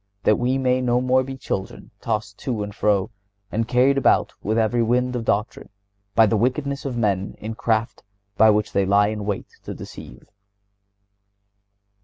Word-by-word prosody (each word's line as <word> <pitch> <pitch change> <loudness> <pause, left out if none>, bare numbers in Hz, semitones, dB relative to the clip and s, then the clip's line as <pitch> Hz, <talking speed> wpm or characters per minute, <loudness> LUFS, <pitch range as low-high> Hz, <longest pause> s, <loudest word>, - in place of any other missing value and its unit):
that 105 - +4
we 125 +2 +1
may 130 -1 +1
no 125 -1 +2
more 130 +1 +3
be 135 0 -6
children, 95 -6 -5
tossed 110 -3 -3
to 115 -6 -2
and 105 0 -7
fro, 105 +1 +1 0.4
and 115 +1 -1
carried 130 +3 +3
about - - +2
with 110 +3 -1
every 115 +1 +2
wind 125 +2 +1
of 120 - -2
doctrine, 105 0 -2 0.5
by 115 - +7
the 110 - +1
wickedness 140 +6 -1
of 130 -3 -3
men, 100 -4 0
in 110 +1 -6
craft, 115 +1 -1 0.3
by 110 +2 +6
which 105 0 +1
they 100 - +2
lie 100 +2 +3
in 105 -1 -4
wait 100 -1 -3
to - - -7
deceive." 60 - -11
115 Hz, 170 wpm, -22 LUFS, 105-125 Hz, 0.5 s, by